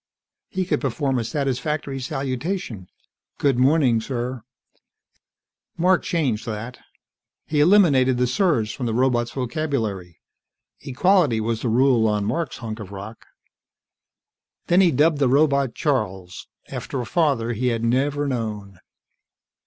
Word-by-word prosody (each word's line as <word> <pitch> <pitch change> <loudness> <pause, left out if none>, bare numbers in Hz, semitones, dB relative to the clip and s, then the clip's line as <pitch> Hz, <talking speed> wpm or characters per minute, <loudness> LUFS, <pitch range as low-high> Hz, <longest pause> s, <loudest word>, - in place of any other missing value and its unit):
He 185 -1 -2
could 155 -5 -1
perform 135 -1 -1
a - - -1
satisfactory 140 +1 -2
salutation: 130 - -4 0.5
"Good 135 -4 +1
morning, 130 -4 +3
sir." 125 +1 -4 1.4
Mark 180 +2 +3
changed 130 -10 -1
that. 115 +3 -6 0.7
He 150 - -1
eliminated 145 -8 +4
the 125 - +2
"sirs" 125 - +1
from 125 - -4
the 110 - -1
robot's 120 -1 +1
vocabulary; 120 - -3 0.6
equality 150 - +2
was 110 0 -2
the 120 - -1
rule 120 -1 +3
on 105 -1 0
Mark's 130 +6 -2
hunk 110 -1 -6
of 100 -3 -9
rock. 100 +3 -9 1.4
Then 175 +2 +4
he 185 - +5
dubbed 150 +1 +2
the 135 -3 +3
robot 140 -2 +2
Charles, 95 - -2 0.2
after 135 - -5
a 120 - -3
father 135 -7 +1
he 125 +3 -1
had 115 -2 -1
never 140 +5 +1
known. 105 -7 -4
130 Hz, 130 wpm, -22 LUFS, 115-145 Hz, 1.4 s, he